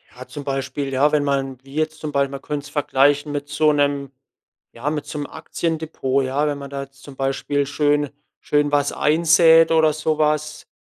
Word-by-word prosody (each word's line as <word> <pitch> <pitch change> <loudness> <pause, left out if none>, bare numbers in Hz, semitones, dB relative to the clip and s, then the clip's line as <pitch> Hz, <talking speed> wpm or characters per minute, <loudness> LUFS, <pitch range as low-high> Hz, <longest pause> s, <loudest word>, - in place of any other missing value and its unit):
Ja, 130 +1 -10
zum 145 -2 -8
Beispiel, 135 0 -3
ja, 145 +3 +3
wenn 150 -1 +2
man 135 -2 -1
wie 135 +1 -14
jetzt 155 0 -1
zum 155 -1 -5
Bei 140 -1 +1
man 135 0 -8
könnt's 145 -1 -5
vergleichen 145 0 +2
mit 145 0 -4
so 150 0 +2
'nem 140 -1 0 0.6
ja, 125 +5 -3
mit 150 -1 -3
so 150 - -7
'nem 145 - -4
Aktiendepot, 155 -5 -2
ja. 140 +3 0
Wenn 145 -1 -2
man 140 0 -8
da 140 0 -5
jetzt 135 0 -17
zum 140 - -11
Beispiel 135 +1 -1
schön 145 0 +1 0.3
schön 145 0 +1
was 145 -1 +2
einsät 165 +1 +5
oder 160 -2 +4
so 155 0 -1
was, 150 0 -1
145 Hz, 195 wpm, -21 LUFS, 140-150 Hz, 0.6 s, einsät